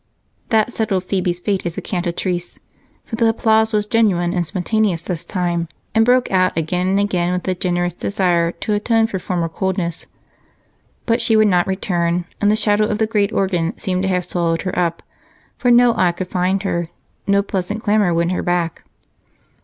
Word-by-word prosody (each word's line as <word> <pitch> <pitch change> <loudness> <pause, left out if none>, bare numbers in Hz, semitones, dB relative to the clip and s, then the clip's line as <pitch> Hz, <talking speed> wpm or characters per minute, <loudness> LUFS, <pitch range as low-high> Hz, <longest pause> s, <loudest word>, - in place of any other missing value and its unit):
That 225 +1 +2
settled 200 -5 -1
Phebe's 180 -2 -1
fate 195 +1 -1
as 175 -1 -4
a - - -2
cantatrice. 175 -1 -3 0.6
The 230 0 +2
applause 220 0 +2
was 210 -1 +1
genuine 200 -6 +2
and 180 -2 0
spontaneous 190 -1 0
this 170 -3 -3
time 175 -3 -2 0.3
and 225 0 +4
broke 250 +1 +3
out 185 -2 +2
again 180 +3 -1
and 195 +1 +2
again 180 -4 0
with 180 0 -2
the 185 - 0
generous 175 -1 -1
desire 175 -3 0
to 210 - -3
atone 225 +2 +2
for 200 -4 -3
former 175 -2 -2
coldness. 175 0 -3 1.0
But 230 0 +1
she 230 -1 +2
would 215 -1 +5
not 180 -2 +2
return, 175 -2 -1 0.2
and 205 - +3
the 210 - +4
shadow 210 -1 +2
of 210 - -1
the 220 - +2
great 210 -2 0
organ 180 -4 -1
seemed 185 -1 -1
to 190 - 0
have 180 -1 0
swallowed 170 -2 -1
her 185 - -3
up, 170 -1 -1 0.6
for 245 - +2
no 240 0 +6
eye 175 -2 +2
could 180 +1 -5
find 185 +2 0
her, 170 -4 -2 0.4
no 200 0 +3
pleasant 200 +3 -3
clamor 205 -3 +2
win 170 0 +1
her 180 - -1
back. 175 -1 -1
185 Hz, 185 wpm, -19 LUFS, 175-210 Hz, 1.0 s, no